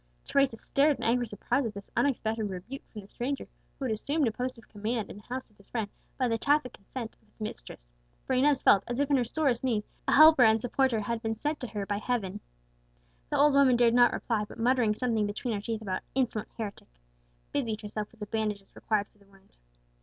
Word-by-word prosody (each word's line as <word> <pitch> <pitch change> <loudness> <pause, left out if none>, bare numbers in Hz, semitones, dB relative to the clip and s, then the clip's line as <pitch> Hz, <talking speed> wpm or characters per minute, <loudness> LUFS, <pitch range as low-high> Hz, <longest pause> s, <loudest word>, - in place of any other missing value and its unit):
Teresa 275 -4 +2
stared 285 +5 +2
in - - -7
angry 240 +1 +2
surprise 205 +6 -1
at 220 -4 -4
this 200 0 -9
unexpected 225 -5 +1
rebuke 195 +9 -7
from 215 - -8
the 195 - -15
stranger, 270 +6 -3 0.3
who 270 - -4
had 245 - 0
assumed 280 +6 0
a - - +1
post 250 +3 -4
of 230 - -16
command 220 +1 -3
in - - -10
the - - -11
house 255 +1 -6
of 210 - -29
his 200 - -20
friend 220 -4 -3 0.3
by 255 - +2
the 230 -1 0
tacit 290 -1 +2
consent 225 +3 -7
of - - -31
its - - -36
mistress; - - -8 0.3
for - - -1
Inez 270 +1 +3
felt 195 -1 +6
as 240 0 -3
if, 285 +1 0
in 280 - +5
her 250 - +2
sorest 265 -1 0
need, 230 -5 +1 0.2
a - - +3
helper 310 -1 +8
and 220 -1 +6
supporter 245 -1 +1
had 230 +2 -2
been 225 -1 -1
sent 295 +7 -2
to 250 - -4
her 205 -3 -4
by 205 0 -1
Heaven. 210 -4 -2 0.9
The - - 0
old 295 0 +5
woman 275 -3 +6
dared 235 -1 +4
not 240 -1 +6
reply, 225 -3 -1
but - - -12
muttering 235 -2 +2
something 225 -3 0
between 220 +3 -3
her 205 - -2
teeth 220 0 -4
about 185 -3 -2
"insolent 235 -5 0
heretic," 210 -3 -6 0.7
busied 225 -6 -1
herself 210 0 -5
with 230 - -23
the - - -2
bandages 210 -2 -3
required 210 -2 0
for 210 - -31
the 200 - -23
wound. 195 0 -24
230 Hz, 230 wpm, -29 LUFS, 210-255 Hz, 0.9 s, helper